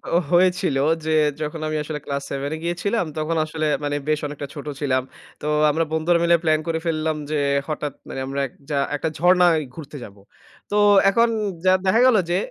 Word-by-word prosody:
ও - - +6
হয়েছিল 175 -5 +3 0.3
যে, 160 - 0 0.3
যখন 155 +1 -4
আমি 155 - -2
আসলে 150 0 -5
ক্লাস 140 0 -3
7 140 +1 -3
এ - - -6
গিয়েছিলাম 180 +5 -1
তখন 155 +2 -1
আসলে 155 0 -3 0.2
মানে 145 0 -1
বেশ 155 -1 +1
অনেকটা 145 -1 -7
ছোট 145 0 -7 0.2
ছিলাম। 130 -2 +1 0.4
তো - - -7 0.3
আমরা 165 +2 0
বন্ধুরা 160 +2 +2
মিলে 170 0 +5
প্ল্যান 155 -1 +3
করে 165 0 -1
ফেললাম 155 -1 0 0.2
যে, 155 - 0 0.3
হঠাৎ 150 -2 -3
মানে - - -6
আমরা 140 +1 -2
একযা 140 +3 -6 0.2
একটা 160 +2 -2
ঝর্ণায় 175 0 +4 0.2
ঘুরতে 150 -2 -9
যাবো। 100 -1 -13 0.5
তো - - 0 0.3
এখন 230 +4 +3 0.4
যা 185 - +6
দেখা 220 +5 +3
গেল 255 -3 +5
যে 175 - +2
155 Hz, 185 wpm, -22 LUFS, 145-170 Hz, 0.5 s, ও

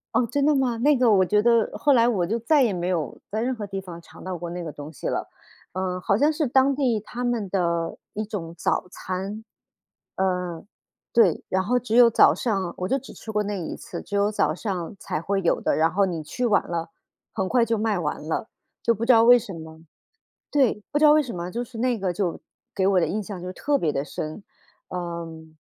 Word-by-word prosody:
哦， 240 - +3
真 280 +3 +1
的 300 - +4
吗？ 260 -4 +1
那 285 +4 +3
个 250 -1 +4
我 190 -3 +5
觉 210 +3 +3
得 230 0 +3
后 285 - +3
来 235 -3 +5
我 190 -8 +1
就 225 +5 0
再 290 +6 +3
也 225 -5 +2
没 175 -1 -2
有 160 -8 -2
在 215 +2 -1
任 255 +2 0
何 215 -3 -5
地 195 -1 -5
方 175 -3 -9
尝 - - -15
到 185 -1 -3
过 170 0 -6
那 175 +1 -5
个 165 -3 -5
东 145 +1 -9
西 150 - -6
了。 - - -2 0.4
呃， 185 0 -3
好 195 - +2
像 290 +6 +4
是 305 0 0
当 265 +2 +3
地 255 -6 +1
他 240 +4 -6
们 235 -5 -1
的 170 -3 0 0.2
一 215 +1 -3
种 175 -6 -5
早 - - 0
餐， 190 +4 -5 0.7
嗯， 180 -2 -2 0.5
对。 210 -9 +4
然 190 0 0
后 250 +5 +2
只 230 -2 -2
有 240 -1 +8
早 225 - +5
上 195 -7 -1
我 180 - -1
就 270 +2 +2
只 270 - -12
吃 220 - -8
过 210 -1 +1
那 205 0 -3
一 165 - -5
次， - - -7
只 205 - -3
有 200 +1 +3
早 155 -7 +1
上 185 0 -4
才 - - -3
会 195 +3 0
有 175 - +1
的， - - +1
然 160 +1 +4
后 200 +1 +3
你 170 -4 -3
去 245 +11 -3
晚 210 -4 +4
了， 170 -1 -3 0.4
很 190 -3 -1
快 245 +3 +3
就 230 0 0
卖 215 -1 0
完 155 -4 -2
了， 190 +8 -2 0.3
就 235 - +3
不 230 +1 -3
知 255 - +6
道 225 -1 +6
为 245 +1 +8
什 215 -4 -8
么 160 -1 -10 0.7
对， 255 -7 +2
不 295 - +1
知 - - +2
道 300 - +8
为 305 0 +6
什 250 -8 -6
么， 175 +1 -5
就 240 +3 -3
是 230 -1 -10
那 245 -1 +1
个 190 -2 -1
就 180 -1 -2 0.3
给 190 - 0
我 195 -1 +3
的 - - +1
印 215 - -2
象 195 -3 -7
就 180 +1 -5
特 285 +9 0
别 160 - 0
地 140 0 -2
深。 155 +5 -6 0.5
嗯。 165 -3 -6
200 Hz, 255 characters per minute, -24 LUFS, 175-235 Hz, 0.7 s, 有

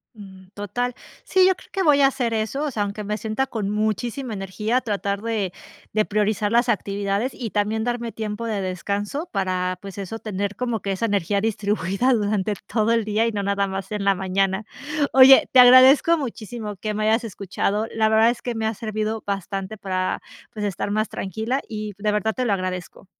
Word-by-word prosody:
Mm. 190 -3 -13
Total. 235 +5 -3 0.3
Sí, 375 -1 +4
yo 380 - +3
creo - - -18
que 390 - -1
voy 295 -4 +5
a 275 - +7
hacer 250 -4 -1
eso, 220 +6 -1
o 300 - -1
sea, 215 -4 -1
aunque 205 +1 -4
me 210 +1 -2
sienta 220 +5 -1
con 210 -4 -3
muchísima 220 +4 -2
energía, 210 +5 -1
tratar 200 -3 -2
de 215 -5 -2 0.4
de 215 0 +2
priorizar 210 0 0
las 235 +1 +3
actividades 200 +3 -1
y 230 -5 -5
también 215 +1 0
darme 235 -1 -2
tiempo 215 +1 -4
de 215 -3 -2
descanso 200 - -3
para, 185 -2 -1
pues 200 0 -9
eso, 195 +3 -5
tener 200 -1 -3
como 240 -4 -2
que 195 - -2
esa 195 +4 -1
energía 200 -2 0
distribuida 215 +2 0
durante 210 -2 0
todo 220 0 +1
el 230 -2 +2
día 215 +2 +1
y - - 0
no 205 -2 -2
nada 200 0 0
más 190 0 -5
en 210 -1 -2
la 195 0 +3
mañana. 190 +2 0 0.5
Oye, 265 0 +8
te 260 - +6
agradezco 260 +6 +8
muchísimo 225 -5 -5
que 215 +3 -4
me 215 +1 -2
hayas 225 +2 +3
escuchado, 205 0 -2
la 220 -1 +3
verdad 220 +1 +5
es 240 - -7
que 245 -1 -3
me 220 0 -2
ha 220 - 0
servido 215 0 -3
bastante 195 +1 -4
para, 185 -2 -2 0.3
pues 210 -2 -3
estar 205 0 -2
más 215 0 0
tranquila, 220 +8 -3
y 215 -2 -5
de 210 +1 0
verdad 210 +1 0
te 255 - -2
lo 215 - +2
agradezco. 185 0 -4
215 Hz, 200 wpm, -23 LUFS, 200-230 Hz, 0.5 s, Oye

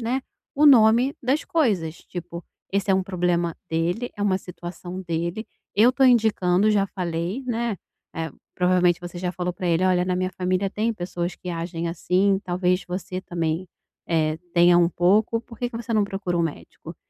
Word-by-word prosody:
né, 245 +3 -1 0.3
o 295 - +3
nome 245 +1 +6
das 265 +5 +1
coisas, 195 - 0
tipo: 175 -1 -8 0.3
"Esse 200 0 0
é - - +5
um 190 - +2
problema 175 -3 0 0.2
dele, 175 +9 -1
é 205 - -3
uma 190 -2 +2
situação 180 0 -8
dele. 170 +5 -3 0.3
Eu 225 +6 +5
tô 270 - 0
indicando, 215 -5 +4
já 200 -2 +2
falei", 180 +5 -3
né. 235 -3 -1 0.4
É, 160 -1 -3 0.2
provavelmente, 180 -1 +3
você 175 0 -7
já 180 0 -2
falou 180 0 -3
pra 180 +1 -5
ele: 170 +2 +2
"Olha, 180 -1 +3
na 180 0 -1
minha 185 0 -1
família 185 +1 -1
tem 220 +3 -1
pessoas 175 -2 -4
que 180 - -7
agem 170 0 -3
assim, 185 +3 +1
talvez 180 +1 0
você 185 +1 -4
também, 170 0 -3 0.4
eh, 155 -2 +1 0.2
tenha 175 0 +6
um 170 -1 +4
pouco. 205 +6 +2
Por 230 -2 -14
que 245 - -1
que 230 - -6
você 230 0 -5
não 210 -1 +3
procura 195 -3 -3
um - - +2
médico?". 165 -3 -6
185 Hz, 185 wpm, -24 LUFS, 175-210 Hz, 0.4 s, nome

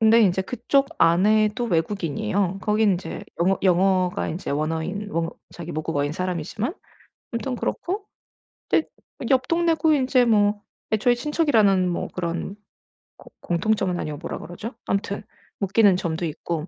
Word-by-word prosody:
근데 225 +1 +6
인제 190 -1 +3
그쪽 255 +6 +1
아내도 210 +7 +3
외국인이에요. 175 - -1
거기는 210 -1 +3
이제 175 -2 -6 0.2
영어 190 +2 +3
영어가 185 0 +2
이제 170 +4 -4
원어인 160 +7 -2
원 165 0 -1 0.2
자기 170 -1 -8
모국어인 150 -1 -1
사람이지만 185 - -3 0.6
아무튼 250 +2 -2
그렇고 395 - -3 0.6
근데 320 - +2 0.4
옆 260 -1 +3
동네고 330 -2 +3
이제 255 -2 +3
뭐 205 -2 +3 0.3
애초에 230 +3 +3
친척이라는 225 - +3
뭐 175 - -2
그런 175 +2 -3 0.6
고 - - -16
공통점은 180 0 0
아니고 150 -1 -4
뭐라 165 - -6
그러죠? 205 +7 -7
아무튼 200 +1 -2 0.4
묶이는 200 0 +4
점도 170 -1 -2
있고 160 +1 -4
195 Hz, 330 characters per minute, -24 LUFS, 170-225 Hz, 0.6 s, 근데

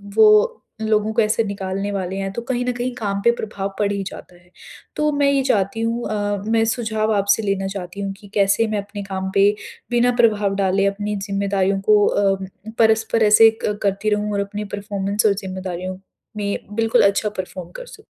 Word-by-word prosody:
वो 215 -1 +6 0.3
लोगों 215 0 +1
को 230 - +3
ऐसे 215 +1 +2
निकालने 195 -1 -3
वाले 190 -2 -3
हैं 195 0 -3
तो 235 - -4
कहीं 245 +1 -2
न 250 - +1
कहीं 245 +1 -3
काम 200 -4 -2
पे 235 - +5
प्रभाव 200 -2 -4
पड़ 205 -1 +1
ही 200 -1 -2
जाता 180 - -10
है। 175 0 -23 0.5
तो 300 0 +1
मैं 285 -1 +2
ये 275 -1 +2
चाहती 205 -2 0
हूँ 230 +1 -1
अ, 205 -1 -1
मैं 225 0 +2
सुझाव 220 -2 0
आपसे 200 +2 +2
लेना 195 -1 -1
चाहती 195 0 -6
हूँ 195 -1 -3
कि 205 - -14
कैसे 200 +3 +3
मैं 215 -1 -2
अपने 205 0 -8
काम 190 -1 -4
पे 200 +1 +6 0.4
बिना 240 +1 +3
प्रभाव 210 -3 +2
डाले 195 0 +1
अपनी 205 +1 -2
ज़िम्मेदारियों 195 -1 0
को 210 -1 +6
अ, 195 -1 +2 0.4
परस्पर 225 0 +3
ऐसे 215 +1 +7 0.2
करती 205 0 -1
रहूँ 210 0 0
और 200 - 0
अपनी 205 +1 -4
परफ़ॉर्मेंस 200 0 -2
और 210 - +5
ज़िम्मेदारियों 185 -1 -5 0.4
में 200 -1 -1 0.2
बिल्कुल 225 0 +3
अच्छा 200 +1 +2
परफ़ॉर्म 185 -2 -6
कर - - -7
सकूँ। - - -14
205 Hz, 190 wpm, -21 LUFS, 195-220 Hz, 0.5 s, ऐसे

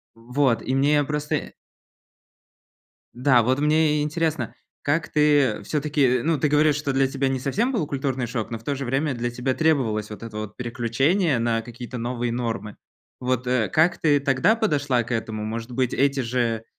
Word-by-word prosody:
Вот, 125 0 0
и 130 - -2
мне 145 +2 +3
просто 150 0 -2
и - - -5 1.6
Да, 125 -1 +4
вот 130 +4 +1
мне 150 0 +3
и - - +1
интересно, 155 -4 -1 0.3
как 150 +2 0
ты 145 -8 +3
всё-таки, 140 -2 +1
ну, 160 -2 +1
ты 150 - +1
говоришь, 150 0 +3
что 145 -2 -2
для 135 0 +3
тебя 135 0 -1
не 135 -1 -1
совсем 215 - 0
был 180 - 0
культурный 135 -3 -2
шок, 115 -1 -4
но 115 - -4
в 115 - -20
то 145 - -1
же 135 0 -4
время 135 +3 0
для 120 0 -2
тебя 125 +2 -2
требовалось 120 -10 +1
вот 105 - -9
это 115 -2 -8
вот 105 -1 -6
переключение 130 - +1
на 115 -1 0
какие-то 120 +1 -8
новые 120 0 -2
нормы. 115 -4 -3 0.4
Вот, 125 0 -1
э, 125 -4 +1
как 160 +3 +2
ты 145 -3 +3
тогда 135 - +3
подошла 145 - +1
к 120 - -12
этому? 110 -2 -3
Может 115 +2 -5
быть, 125 0 0
эти 140 0 +2
же, 115 -2 -1
130 Hz, 185 wpm, -24 LUFS, 120-150 Hz, 1.6 s, Да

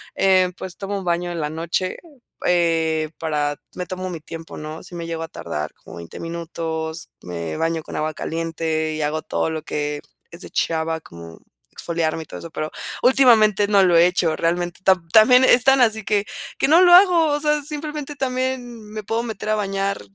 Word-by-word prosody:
eh, 185 -1 +3
pues, 185 -2 -7
tomo 200 0 -4
un 190 - -6
baño 175 0 0
en 170 - -4
la 150 0 -2
noche, 170 +3 -2 0.5
eh, 160 -3 +1
para 150 -2 -1 0.2
me 180 - -4
tomo 185 +1 -5
mi 170 - -6
tiempo, 165 +1 -9
¿no?, 155 +1 -7
si 175 - -10
me 170 -1 -5
llego 165 -1 -4
a 165 - -5
tardar 75 - -5
como 80 - -13
20 85 -1 -9
minutos, 165 -1 -5
me 85 -3 -5
baño 165 - -1
con - - -9
agua 155 0 -2
caliente 160 -1 -2
y 155 - -3
hago 155 +1 -1
todo 160 - -2
lo 160 -1 -3
que 150 -1 -3 0.3
es 170 - -8
de - - -8
chava, 160 0 -1
como 85 - -12 0.3
exfoliarme 165 -1 -2
y - - -18
todo - - -9
eso, 165 - -9
pero 155 0 -4 0.3
últimamente 225 -6 +5
no 200 -2 +5
lo 175 -2 +4
he 170 +1 +7
hecho 175 -3 +1
realmente, 175 +1 -1
tam 185 -3 +3
también, 250 +4 +7
es 245 -1 +5
tan 270 -1 +5
así 220 -2 +2
que 205 0 +1 0.3
que - - +2
no 330 +4 +6
lo 350 -1 +7
hago, 355 -3 +6
o 290 -1 +1
sea, 300 0 +1
simplemente 300 0 -5
también 255 -4 -3
me 215 0 -6
puedo 225 +3 -1
meter 215 -2 -5
a 215 - +3
bañar 195 -1 -2
175 Hz, 200 wpm, -21 LUFS, 160-215 Hz, 0.5 s, he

